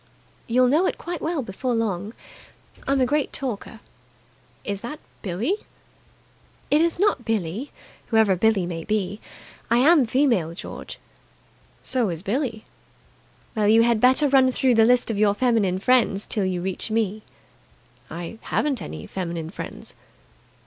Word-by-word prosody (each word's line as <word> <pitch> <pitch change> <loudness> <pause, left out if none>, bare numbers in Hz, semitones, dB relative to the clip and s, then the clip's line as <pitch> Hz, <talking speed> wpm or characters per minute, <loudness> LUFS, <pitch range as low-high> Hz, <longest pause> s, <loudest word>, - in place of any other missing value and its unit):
"You'll 250 +2 +4
know 305 +9 +3
it - - -2
quite 345 0 -5
well 320 -3 -1
before 240 +4 -2
long. 210 -1 -2 0.7
I'm 275 0 +2
a 255 - +4
great 290 +3 0
talker." 230 -3 -5 0.8
"Is 200 -1 -4
that 245 +6 -6 0.2
Billie?" 215 - -1 1.1
"It 295 +2 +5
is 335 0 +1
not 395 -9 +2
Billie, 220 - -2 0.4
whoever 220 -4 +3
Billie 200 -1 +2
may 165 -2 -5
be. 210 0 -2 0.5
I 235 - +4
am 285 0 +5
female, 225 - +1
George." - - -8 0.9
"So 245 -6 0
is 170 0 -5
Billie." 225 +1 -2 0.9
"Well, 215 -2 +2
you 225 +2 +6
had 235 -2 +3
better 260 +4 +5
run 265 -1 +4
through 255 0 +2
the 225 -1 +5
list 245 0 +3
of 205 - -3
your 205 -1 +3
feminine 215 -6 +2
friends 220 -2 +2
till 205 -4 0
you 180 -2 -2
reach 190 +3 -3
me." 215 -1 -1 0.9
"I 170 +7 -7
haven't 285 -4 -1
any - - -7
feminine 170 -3 -5
friends." - - -7
225 Hz, 145 wpm, -24 LUFS, 195-260 Hz, 1.1 s, you